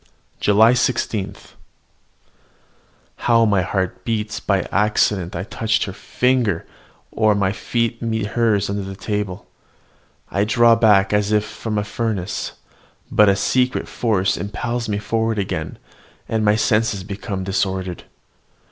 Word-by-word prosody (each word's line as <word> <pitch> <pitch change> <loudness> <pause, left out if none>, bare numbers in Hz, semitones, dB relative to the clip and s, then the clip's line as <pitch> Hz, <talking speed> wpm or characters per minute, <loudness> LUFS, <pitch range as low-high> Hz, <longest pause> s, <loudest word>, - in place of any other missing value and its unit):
JULY 110 +3 +5
16. 110 -5 -1 1.8
How 115 -1 +3
my 100 -3 +3
heart 95 0 -2
beats 105 -2 -2
when 100 -2 +2
by - - -9
accident 100 -3 +1
I 85 - -3
touch 110 +2 0
her 95 - -6
finger, 120 -5 0 0.5
or 110 -2 +2
my 100 -1 +1
feet 115 +2 -2
meet 110 -3 -1
hers 110 -4 +2
under 100 0 -2
the 95 0 -6
table! 105 -2 -4 0.9
I 100 - +1
draw 115 +2 +5
back 105 -3 +4
as 105 0 +1
if 105 0 +2
from 105 0 -4
a 105 - 0
furnace; 105 -3 -3 0.6
but 105 -1 +5
a 100 - +4
secret 125 +5 0
force 100 -5 0
impels 115 +3 -3
me 105 - 0
forward 110 +1 -1
again, 80 -6 -3 0.5
and 110 -1 0
my 105 0 +4
senses 110 -2 +1
become 100 0 -5
disordered. 95 -1 -2
105 Hz, 135 wpm, -20 LUFS, 100-115 Hz, 1.8 s, JULY